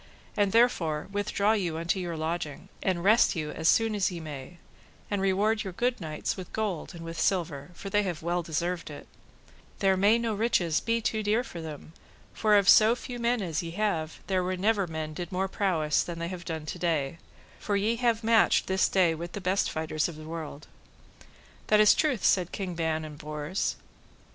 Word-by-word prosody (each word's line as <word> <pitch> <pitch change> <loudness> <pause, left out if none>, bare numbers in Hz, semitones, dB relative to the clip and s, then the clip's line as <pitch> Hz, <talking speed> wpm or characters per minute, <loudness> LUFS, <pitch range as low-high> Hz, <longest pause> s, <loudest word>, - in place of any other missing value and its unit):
And 205 -2 +2
therefore 185 -11 +2
withdraw 205 +1 +1
you 180 -7 0
unto 170 +3 -1
your 175 -3 -4
lodging, 160 -2 -4
and 180 -3 0
rest 215 +2 +5
you 155 -2 -3
as 160 0 +1
soon 225 -1 +3
as 200 -3 +1
ye 175 -2 -6
may, 155 +1 -8 0.5
and 200 -1 0
reward 205 +3 +2
your 190 -3 -6
good 245 +3 -1
knights 155 -2 -3
with 185 -2 -8
gold 205 -7 -3
and 165 -1 -8
with 165 -1 -6
silver, 165 -5 0
for 195 +3 -7
they 205 - +3
have 175 -6 -4
well 175 +1 0
deserved 170 +1 -3
it; 145 - -10 0.7
there 195 -1 +3
may 205 +4 +4
no 230 -1 -1
riches 195 -7 +1
be 230 0 0
too 220 0 -1
dear 215 +3 +1
for 170 -8 -8
them, 155 0 -8 0.4
for 215 -1 +4
of 200 -1 +2
so 220 +2 +7
few 245 0 -7
men 235 -2 +1
as 165 -4 -2
ye 170 - -6
have, 165 -7 -1
there 185 -1 0
were 185 +1 -2
never 200 0 +1
men 160 -1 -5
did 175 +2 -6
more 190 +1 0
of 190 - -7
prowess 160 -7 +1
than 170 -1 -5
they 170 0 -3
have 180 -2 -7
done 160 -2 -4
today, 165 -3 -2 0.4
for 205 - -1
ye 215 +4 +1
have 230 -2 +1
matched 225 0 +4
this 190 0 +2
day 180 -4 +3
with 170 +2 -7
the - - -4
best 190 +1 +1
fighters 155 -1 -1
of 170 - -8
the 155 - -10
world. 155 -2 -7 1.0
That 210 - +4
is 215 - +7
truth, 290 -8 0
said 180 -2 +3
King 190 -3 -4
Ban 160 -1 -1
and 150 -1 -10
Bors. 150 +4 -3
180 Hz, 200 wpm, -28 LUFS, 160-210 Hz, 1.0 s, so